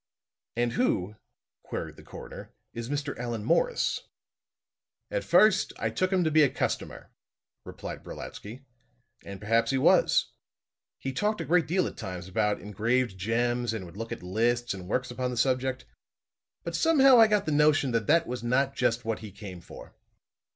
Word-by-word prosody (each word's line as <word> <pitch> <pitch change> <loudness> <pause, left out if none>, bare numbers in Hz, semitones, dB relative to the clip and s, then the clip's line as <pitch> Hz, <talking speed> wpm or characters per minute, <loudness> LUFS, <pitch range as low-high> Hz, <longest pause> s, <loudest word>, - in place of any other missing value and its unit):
"And 120 0 +1
who," 105 - 0 0.4
queried - - -6
the - - -14
coroner, - - -11 0.2
"is 115 +1 -6
Mr. 145 -1 -3
Allan 120 -3 -3
Morris?" - - +1 1.0
"At - - -1
first 195 +2 +4
I - - -2
took 185 0 0
him 185 -2 +2
to 160 - +1
be 155 +1 +5
a 145 - +5
customer," - - -4 0.5
replied - - -8
Brolatsky. 120 +6 -9 0.6
"And 100 -1 -8
perhaps 115 +2 +1
he 135 - +1
was. 130 - +3 0.7
He 135 - -5
talked 210 +8 0
a - - -3
great 175 0 +2
deal 180 +3 +1
at - - -6
times 90 -5 -6
about 105 +2 0
engraved 110 +2 -1
gems 120 +4 0
and 105 -4 -5
would 85 - -13
look 115 +2 -6
at - - -6
lists 120 +6 0
and 95 -2 -8
works 125 +5 -1
upon 125 +1 -2
the 125 - -5
subject. 130 +1 0 0.8
But - - -4
somehow 275 -6 +6
I 225 - +8
got 210 -2 +1
the 155 - -1
notion 150 -2 +3
that 115 -2 -1
that 165 +2 +4
was 125 -3 -5
not 135 +3 +1
just 115 +1 0
what 115 -1 -2
he 110 - -8
came 95 -3 -9
for." - - -12
125 Hz, 170 wpm, -28 LUFS, 110-155 Hz, 1.0 s, I